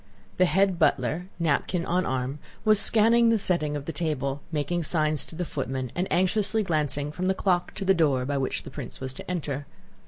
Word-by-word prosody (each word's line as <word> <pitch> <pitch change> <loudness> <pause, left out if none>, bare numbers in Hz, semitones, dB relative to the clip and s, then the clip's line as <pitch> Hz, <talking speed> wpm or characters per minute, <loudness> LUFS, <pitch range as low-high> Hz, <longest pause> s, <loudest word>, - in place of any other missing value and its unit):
The 185 - +5
head 190 +2 +2
butler, 155 +9 +1
napkin 170 +2 0
on 180 +2 0
arm, 130 +2 -2 0.3
was 215 -1 +6
scanning 230 +2 +5
the 230 - +4
setting 170 -7 0
of 145 -1 -5
the 165 - -4
table, 140 -4 -2
making 155 +3 -1
signs 155 -3 0
to - - -9
the 175 +2 -2
footmen, 130 -4 -4
and 180 +2 -1
anxiously 205 +4 +1
glancing 150 -4 -1
from 180 +4 -3
the 190 - +2
clock 180 -3 0
to 200 - -4
the 195 - +5
door 145 -7 +2
by 140 +1 -1
which 130 - -2
the - - -10
prince - - -5
was 130 0 -5
to - - -9
enter. 145 -5 -3
165 Hz, 200 wpm, -26 LUFS, 140-185 Hz, 0.3 s, was